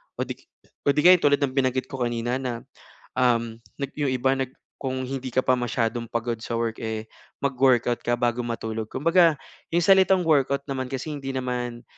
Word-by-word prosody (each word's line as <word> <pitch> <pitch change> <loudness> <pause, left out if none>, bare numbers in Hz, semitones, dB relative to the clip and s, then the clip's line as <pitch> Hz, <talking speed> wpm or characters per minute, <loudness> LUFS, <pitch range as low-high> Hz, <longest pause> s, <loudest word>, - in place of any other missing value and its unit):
o - - -1
'di - - -5 0.5
o - - +7
'di 150 - +3
kaya 180 0 +8
tulad 145 -3 +3
ng 135 - +1
binanggit 130 -1 0
ko 135 - -5
kanina 120 +1 -1
na, 125 -3 -4 0.5
um, 115 -3 +1 0.4
yung 145 -3 0
iba 130 +1 +2
nag 130 -1 -2 0.3
kung 130 -1 -2
hindi 135 0 -4
ka 130 - +4
pa 130 - +4
masyadong 115 0 -1
pagod 115 0 -2
sa 115 - -4
work, 115 -1 -2
eh, 110 -1 -3 0.4
mag-workout 130 -3 +2
ka 120 - +1
bago 120 0 0
matulog. 110 -2 -4
Kumbaga 165 +1 +4 0.4
'yong 170 0 +3
salitang 190 -1 +5
workout 140 -3 +2
naman 130 -2 -2
kasi 135 +4 -4
hindi 135 -2 -5
naman, 125 -2 -3
130 Hz, 180 wpm, -25 LUFS, 120-140 Hz, 0.5 s, kaya